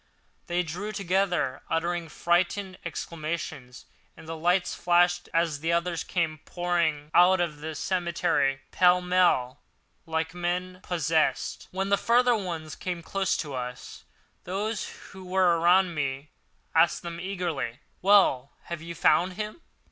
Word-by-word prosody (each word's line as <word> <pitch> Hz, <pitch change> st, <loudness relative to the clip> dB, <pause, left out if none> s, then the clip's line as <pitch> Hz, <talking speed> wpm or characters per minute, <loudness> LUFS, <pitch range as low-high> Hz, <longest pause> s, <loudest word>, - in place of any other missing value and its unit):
They 175 Hz, 0 st, 0 dB
drew 180 Hz, +6 st, -5 dB
together, 185 Hz, -8 st, 0 dB
uttering 170 Hz, 0 st, -1 dB
frightened 185 Hz, +4 st, 0 dB
exclamations; 155 Hz, -5 st, -5 dB, 0.3 s
and -, -, -13 dB
the 165 Hz, -, -4 dB
lights 175 Hz, +3 st, +1 dB
flashed 175 Hz, 0 st, +2 dB
as 165 Hz, -3 st, +1 dB
the 165 Hz, +3 st, -1 dB
others 170 Hz, 0 st, 0 dB
came 160 Hz, -4 st, -1 dB
pouring 165 Hz, -4 st, -1 dB
out 180 Hz, +1 st, +6 dB
of 160 Hz, -4 st, -1 dB
the 160 Hz, +1 st, -5 dB
cemetery 170 Hz, -7 st, 0 dB
pell 180 Hz, 0 st, +5 dB
mell, 180 Hz, -8 st, +2 dB, 0.5 s
like 160 Hz, 0 st, -2 dB
men 180 Hz, +1 st, -3 dB
possessed. 160 Hz, -2 st, 0 dB
When 195 Hz, +1 st, -2 dB
the 200 Hz, -, +4 dB
further 245 Hz, +2 st, +3 dB
ones 165 Hz, -7 st, -4 dB
came 175 Hz, -2 st, -4 dB
close 195 Hz, +2 st, 0 dB
to 145 Hz, -, -7 dB
us, 125 Hz, -1 st, -6 dB, 0.4 s
those 205 Hz, +5 st, -3 dB, 0.2 s
who 190 Hz, -1 st, -11 dB
were 180 Hz, -2 st, +2 dB
around 175 Hz, +1 st, +4 dB
me 140 Hz, -1 st, -3 dB, 0.4 s
asked 165 Hz, +1 st, +3 dB
them 170 Hz, -1 st, -6 dB
eagerly: 175 Hz, -10 st, -3 dB, 0.2 s
"Well, 185 Hz, -9 st, +4 dB
have 170 Hz, -2 st, -6 dB
you 170 Hz, +1 st, -7 dB
found 180 Hz, +2 st, +3 dB
him?" 215 Hz, -, -6 dB
175 Hz, 135 wpm, -27 LUFS, 160-185 Hz, 0.5 s, out